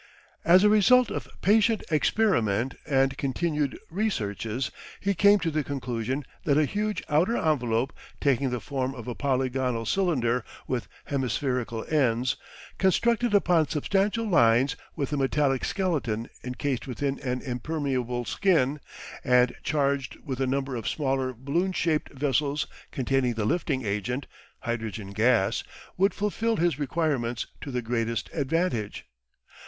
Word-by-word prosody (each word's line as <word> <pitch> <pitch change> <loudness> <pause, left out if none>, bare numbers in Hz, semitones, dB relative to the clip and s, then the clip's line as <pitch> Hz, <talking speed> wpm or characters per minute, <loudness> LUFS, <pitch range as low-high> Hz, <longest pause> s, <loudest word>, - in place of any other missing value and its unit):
As 180 +3 +6
a 210 - +6
result 230 +4 +5
of - - -4 0.2
patient 220 +2 +4
experiment 135 - +2
and 135 -2 +2
continued 150 +1 -1
researches 125 - -2 0.3
he 200 +1 +1
came 205 +2 +6
to 170 -4 -1
the 155 0 0
conclusion 130 0 -3 0.2
that 145 -2 +2
a 155 - +4
huge 210 +3 -2
outer 170 +10 +2
envelope 125 -5 +1 0.3
taking 140 -2 +2
the 125 -1 -2
form 135 +1 -3
of 120 -1 -8
a 120 - -2
polygonal 130 -3 0
cylinder 125 - +1 0.2
with 125 -2 -2 0.2
hemispherical 125 -3 -1
ends, 125 -5 +2 0.4
constructed 230 +4 +2
upon 175 -6 +4
substantial 200 +8 0
lines 120 - +4 0.2
with 145 -2 -2
a - - +1
metallic 135 -1 +1
skeleton 140 - -1 0.2
encased 125 +1 -3
within 135 +2 -2
an 125 -2 -2
impermeable 125 -2 -2
skin, 150 - +2 0.4
and 125 -1 +4
charged 140 -3 0
with 135 -3 -3
a 135 - +2
number 135 0 -1
of 115 -3 -4
smaller 135 -3 0
balloon 140 +10 -1
shaped 160 -4 0
vessels 145 +1 0 0.3
containing 130 -2 0
the 110 -2 -1
lifting 140 -3 0
agent 105 +7 -2 0.4
hydrogen 110 -4 -4
gas 110 -1 +2 0.3
would 195 +1 +2
fulfil 220 +2 0
his 170 -4 +1
requirements 135 -5 -1 0.2
to - - -6
the 125 -2 -2
greatest 115 -2 -2
advantage. 145 - -1
135 Hz, 135 wpm, -27 LUFS, 125-165 Hz, 0.4 s, As